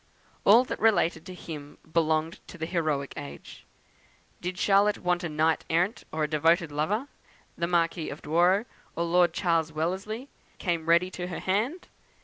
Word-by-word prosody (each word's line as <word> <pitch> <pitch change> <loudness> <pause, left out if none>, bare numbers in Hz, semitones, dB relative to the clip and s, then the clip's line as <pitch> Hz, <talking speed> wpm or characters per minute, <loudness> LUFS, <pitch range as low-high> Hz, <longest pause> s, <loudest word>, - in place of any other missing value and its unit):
All 225 +5 +7
that - - -5
related 175 -7 +2
to 185 - -8
him 150 -5 -9 0.2
belonged 160 +2 +1
to 185 - -11
the 160 - -3
heroic 155 -5 -1
age. 70 0 -9 0.7
Did 180 +1 -4
Charlotte 200 +2 +3
want 180 0 0
a 170 - -2
knight 160 +1 +1
errant, 175 +7 0
or 155 0 -1
a - - +1
devoted 165 +2 +2
lover, 200 - -1 0.5
the 170 - -1
Marquis 170 -1 0
of 145 - -8
Douro, 175 +7 +3 0.3
or 170 - 0
Lord 175 0 +3
Charles 165 -3 0
Wellesley, 190 - -3 0.3
came 170 -3 -2
ready 175 +2 +4
to 180 -1 -5
her 175 - -5
hand. 225 - -1
170 Hz, 160 wpm, -27 LUFS, 160-185 Hz, 0.7 s, All